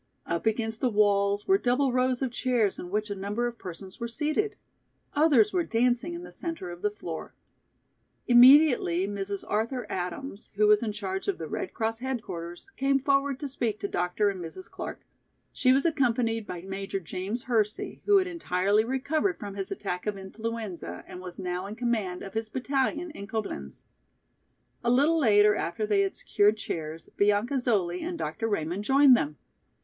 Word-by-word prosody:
Up 170 +5 -2
against 225 0 -1
the 255 - +3
walls 205 -1 +2
were 385 +1 +5
double 255 0 +2
rows 255 0 +1
of 260 - -1
chairs 240 -5 +1
in 175 - -6
which 210 +2 -2
a - - -2
number 205 +5 -2
of 240 -1 -4
persons 185 +2 -8
were 235 - -3
seated. 305 - -1 0.6
Others 320 +8 +4
were 360 -2 +2
dancing 245 +7 +1
in 345 - -7
the - - -10
centre 325 - -5
of 175 0 -10
the 210 - +2
floor. 175 -6 -7 0.9
Immediately 245 - +6
Mrs. 200 -1 -4
Arthur 230 +4 -1
Adams, 190 +5 -5
who 210 +1 +4
was 210 0 +5
in 225 -2 -1
charge 195 -2 -4
of 400 - 0
the - - -5
Red 370 - -4
Cross 225 0 -1
headquarters, 220 - -5
came 275 0 +3
forward 275 0 +1
to 290 - -3
speak 235 -5 -2
to - - -2
Dr. 180 +3 0
and 185 -3 -7
Mrs. 170 - -9
Clark. - - -7 0.5
She 255 - +3
was 270 +4 +3
accompanied 235 -7 +1
by 175 -1 -5
Major 195 +1 -4
James 190 +6 -4
Hersey, 220 -3 -1
who 410 -1 +6
had 380 - +3
entirely 210 - +1
recovered 290 - 0
from 205 -1 -7
his 195 -1 -4
attack 180 -1 -4
of 210 -1 -1
influenza 195 - -5
and 180 - -9
was 180 -1 -8
now 180 0 -3
in 210 - -7
command 220 -7 -1
of 195 - -8
his 220 0 -2
battalion 275 +7 -1
in 200 -9 -8
Coblenz. 200 - -5 1.0
A 235 - +2
little 290 +7 +4
later, 210 -5 +5
after 190 +1 -2
they 205 -2 +3
had 195 -1 -1
secured 210 +1 +2
chairs, 160 -4 -5
Bianca 210 +6 +2
Zoli 195 -8 0
and 345 0 -4
Dr. 225 - -3
Raymond 185 -1 -2
joined 270 +2 +6
them. 150 -9 -2
220 Hz, 180 wpm, -28 LUFS, 195-260 Hz, 1.0 s, Immediately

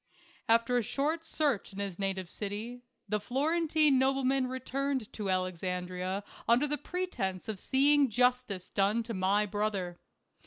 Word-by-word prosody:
After 230 +2 +4
a - - +1
short 300 +8 -1
search 290 -11 0
in 195 - -12
his 200 -3 -4
native 190 -2 -2
city, 215 +6 -5 0.3
the 210 - 0
Florentine 300 +4 +2
nobleman 265 0 +2
returned 260 -1 -3
to 205 -3 -3
Alexandria 185 +1 -2 0.2
under 235 +5 +4
the 295 -1 -2
pretense 255 - -3
of 215 -3 -4
seeing 280 +3 +4
justice 245 -5 +1
done 205 +3 +2
to 230 0 -5
my 195 +2 +2
brother. 200 -4 -2
230 Hz, 140 wpm, -31 LUFS, 195-270 Hz, 0.3 s, After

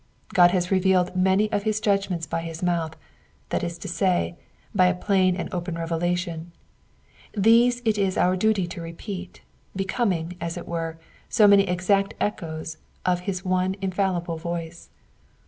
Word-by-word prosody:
God 175 -1 +7
has 180 0 0
revealed 185 -1 +3
many 190 +3 +3
of 205 - +1
his 215 +1 0
judg 200 -2 +1
ments 170 -3 -2
by 165 - -2
his 165 +1 -6
mouth, 170 -3 0 0.5
that - - -1
is 170 -1 -3
to 185 - -8
say, 180 -1 +1 0.4
by 185 - +5
a 180 - +2
plain 185 -1 +2
and 180 - -3
open 175 -1 -3
revelation; 170 0 -2 0.9
these 235 +4 +4
it 215 -2 +2
is 195 -2 +1
out 185 +1 +2
duty 215 -3 +2
to 175 0 -7
repeat, 180 +3 -7 0.3
becoming, 185 -4 -1
as 170 +1 -3
it 175 - -7
.were, 165 -1 -3 0.3
so 220 -3 +5
many 200 -1 +6
exact 195 +2 +1
echoes 160 -5 -3 0.3
of 180 -1 +2
his 185 0 -3
one 185 +1 +1
infallible 185 -3 -1
voice. 170 0 -5
180 Hz, 160 wpm, -25 LUFS, 170-195 Hz, 0.9 s, God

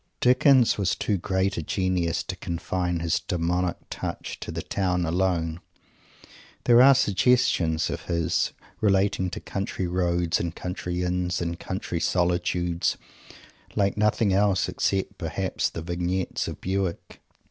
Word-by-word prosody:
Dickens 125 -2 +5
was 95 -2 +1
too 100 -3 -1
great 95 +2 0
a - - -1
genius 90 0 0
to - - -5
confine 90 0 -2
his 85 -1 +1
demonic 90 +1 -1
touch - - -5
to - - -6
the - - -4
town 90 -3 0
alone. 85 -1 0 1.0
There 120 0 +6
are 135 +1 +8
suggestions 100 -8 +2
of - - -5
his, 85 -2 0 0.3
relating 100 -2 +2
to 85 - -6
country 95 -1 -3
roads 85 -1 0
and 85 0 -3
country 90 0 -3
Inns 90 0 -1
and 85 0 -3
country 95 -2 -4
solitudes, 90 0 0 0.8
like 100 -2 +2
nothing 105 -1 +2
else, 100 -2 +2
except, 95 -1 -1
perhaps, - - -1
the 80 - -6
Vignettes 90 +2 -2
of - - -6
Bewick. 95 -2 -3
90 Hz, 135 wpm, -26 LUFS, 85-100 Hz, 1.0 s, are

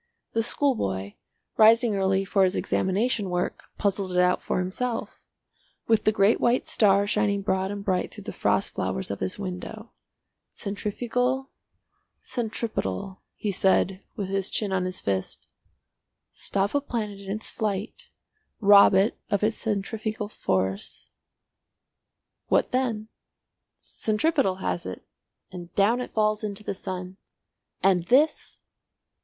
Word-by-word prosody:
The 225 - +2
schoolboy, 100 - 0 0.4
rising 225 0 +6
early 195 0 +1
for 195 0 +3
his 185 0 +2
examination 205 +2 0
work, 180 0 -2
puzzled 195 -2 0
it - - -1
out 180 0 +3
for - - -2
himself—with 225 +2 -3
the 215 - +5
great 205 +1 +3
white 240 +1 +2
star 200 -2 +4
shining 205 -1 +1
broad 190 -1 0
and 200 0 -5
bright 185 -2 0
through - - -10
the - - -6
frost - - +1
flowers 65 - -2
of 100 - -4
his 95 -1 -2
window. 200 +4 -6 0.6
"Centrifugal, 245 +6 -2 0.7
centripetal," 215 - -3
he 210 - -2
said, 190 0 +2
with 195 -2 -4
his 195 -1 -1
chin 210 -3 -2
on 185 -1 +1
his 185 0 -3
fist. 95 -1 -3 0.9
"Stop 200 +1 -1
a 285 - +2
planet 215 -7 -4
in 195 -1 -10
its 215 +3 -2
flight, 210 -1 -3 0.5
rob 200 -2 +7
it 195 +5 +2
of 200 0 0
its 215 +1 +1
centrifugal 215 +1 -3
force, 95 - -2 1.4
what - - +2
then? 235 -4 -1 0.7
Centripetal 220 - 0
has 175 - -1
it, 95 - -7 0.5
and 175 -1 -9
down 225 +5 +3
it - - -5
falls 215 0 +2
into 210 0 -3
the - - -3
sun! 185 -1 -6 0.7
And 185 -3 +3
this—! 290 +5 +2
200 Hz, 130 wpm, -26 LUFS, 190-220 Hz, 1.4 s, rob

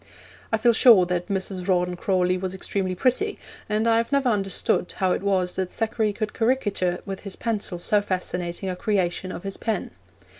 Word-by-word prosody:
I 225 - +3
feel 235 +2 +4
sure 220 -6 +7
that 175 0 -2
Mrs. 190 -1 -3
Rawdon 180 -1 +1
Crawley 180 0 +1
was 185 0 -4
extremely 190 -1 -2
pretty, 275 - +1 0.3
and 215 +2 +1
I 225 0 +4
have 230 +3 -1
never 275 -2 +2
understood 195 -4 0
how 185 -1 +2
it - - 0
was 190 -2 0
that 190 -1 -1
Thackeray 220 0 -1
could 210 +1 -4
caricature 205 -7 0
with 195 -1 -5
his 200 -2 -8
pencil 215 -5 -3
so 205 +4 +1
fascinating 180 -2 -3
a 185 - -2
creation 185 -3 -1
of 175 - -7
his 195 -1 -3
pen. 220 -4 -2
195 Hz, 185 wpm, -24 LUFS, 180-220 Hz, 0.3 s, sure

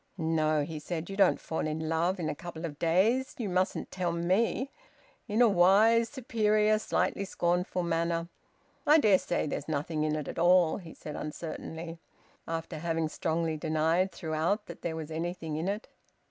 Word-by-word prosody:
"No," 155 -2 +1
he 155 +1 -5
said, 170 +3 -5
"you - - -4
don't 195 -2 +4
fall 160 -1 -3
in 155 +1 -3
love 170 +4 +1
in 165 - -2
a - - -1
couple 170 +1 -7
of 145 -3 -7
days. 205 +11 +2
You 230 - -3
mustn't 185 +1 -1
tell 180 -2 -1
me 190 +10 0 0.3
" - - -33
in 225 +2 +3
a - - +7
wise, 215 +5 +5
superior, 215 -4 +2
slightly 200 - 0
scornful 180 -1 0
manner. 170 0 0 0.6
"I 300 +2 +8
dare 210 -10 +5
say 175 - -1
there's 145 -1 -4
nothing 155 +1 -1
in 155 0 0
it 150 -2 -4
at - - -5
all," 175 -1 +5
he 170 -5 -11
said 150 -1 -8
uncertainly, 165 +2 -6 0.5
after 165 0 -4
having 165 -1 -1
strongly 160 -1 -1
denied 160 +4 +1
throughout 165 +6 -1
that 170 - -10
there 165 -1 -3
was 160 -1 -6
anything 165 -1 -3
in 160 +4 -2
it. 205 +3 -3
170 Hz, 175 wpm, -30 LUFS, 160-195 Hz, 0.6 s, I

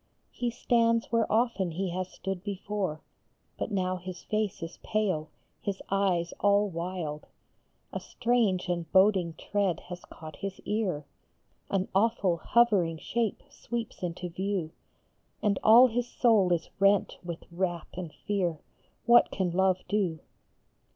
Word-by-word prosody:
He 245 - -2
stands 230 -1 +2
where 230 -1 +2
often 225 -5 +2
he 185 +1 -2
has 185 +1 -3
stood 190 -1 -5
before; 200 -5 -3 0.6
But - - -2
now 185 -3 0
his 180 0 -8
face 215 -5 -2
is 165 +1 -7
pale, 195 -8 -1 0.3
his 200 -1 -3
eyes 185 -4 +1
all 205 +1 +4
wild, 170 -3 -4 0.7
A - - -2
strange 230 -7 +1
and 170 -2 -2
boding 190 -4 +4
tread 200 -4 0
has 180 0 -7
caught 155 -1 -11
his 195 -1 -5
ear, 200 -9 -1 0.6
An 195 -1 0
awful, 195 -3 +2
hovering 190 -5 +3
shape 225 +5 -2
sweeps 235 -1 -5
into 180 0 -3
view, 180 -1 -2 0.7
And 205 -2 +2
all 230 +4 +9
his 245 0 0
soul 220 -7 +3
is 170 -2 0
rent 200 0 +3
with 170 -2 -6
wrath 175 -1 -2
and 180 -3 -6
fear 180 -2 -1 0.5
What 235 +1 +6
can 185 -3 -1
Love 185 +1 +2
do 195 -6 0
190 Hz, 135 wpm, -29 LUFS, 175-215 Hz, 0.7 s, all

